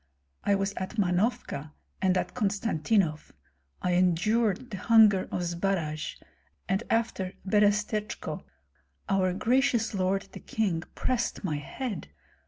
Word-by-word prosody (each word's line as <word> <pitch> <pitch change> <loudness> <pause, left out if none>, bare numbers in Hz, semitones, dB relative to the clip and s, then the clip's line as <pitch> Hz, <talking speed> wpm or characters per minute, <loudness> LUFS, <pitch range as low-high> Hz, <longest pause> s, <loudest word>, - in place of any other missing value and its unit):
I 200 - +3
was 195 0 -1
at 190 +5 -4
Mahnovka 180 - 0 0.3
and 190 -1 +3
at - - -2
Konstantinoff; 200 -6 0 0.5
I 180 - +1
endured 205 +6 +2
the 195 - -4
hunger 210 -1 +5
of 180 - -1
Zbaraj, 170 -3 -1 0.5
and 195 +2 +1
after 225 -5 0
Berestechko 210 +1 +1 0.6
our 190 -2 +2
gracious 240 +2 +2
lord 195 0 +1
the - - -9
king 195 -7 -1
pressed 240 -3 -1
my 155 -6 -1
head. 205 - -5
195 Hz, 115 wpm, -28 LUFS, 180-220 Hz, 0.6 s, hunger